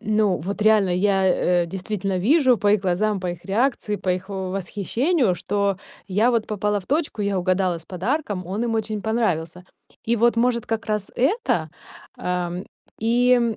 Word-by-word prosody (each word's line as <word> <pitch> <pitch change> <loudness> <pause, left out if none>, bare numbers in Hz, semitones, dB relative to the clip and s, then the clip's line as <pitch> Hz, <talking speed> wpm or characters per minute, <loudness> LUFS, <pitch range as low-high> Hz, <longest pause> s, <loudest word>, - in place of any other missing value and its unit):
ну, 210 -3 +1
вот 200 +6 -4
реально, 215 -3 +4
я, 190 +1 +2 0.4
э, - - -3
действительно 190 +1 -3
вижу 260 - +4
по 205 +1 +3
их 210 - +3
глазам, 195 +2 0
по 180 - -3
их 175 -1 -9
реакции, 220 0 0
по 185 - -6
их, 185 +2 -2
э, - - -5
восхищению, 195 - 0
что 200 +2 -1 0.3
я 210 +6 +3
вот 230 -3 0
попала 210 0 -1
в 185 - -18
точку, 290 -7 -1
я 200 -1 0
угадала 185 -1 +1
с 165 - -14
подарком, 200 - -2
он 200 +6 -2
им 230 -1 -1
очень 215 -1 -2
понравился. 180 -7 -1 0.4
И 235 +1 +1
вот 235 +1 +3
может 235 0 +1
как 225 0 -3
раз 210 -2 -2
это, 400 - 0 0.5
ам, 180 0 -3 0.3
и, 235 0 +3
205 Hz, 175 wpm, -23 LUFS, 185-230 Hz, 0.5 s, реально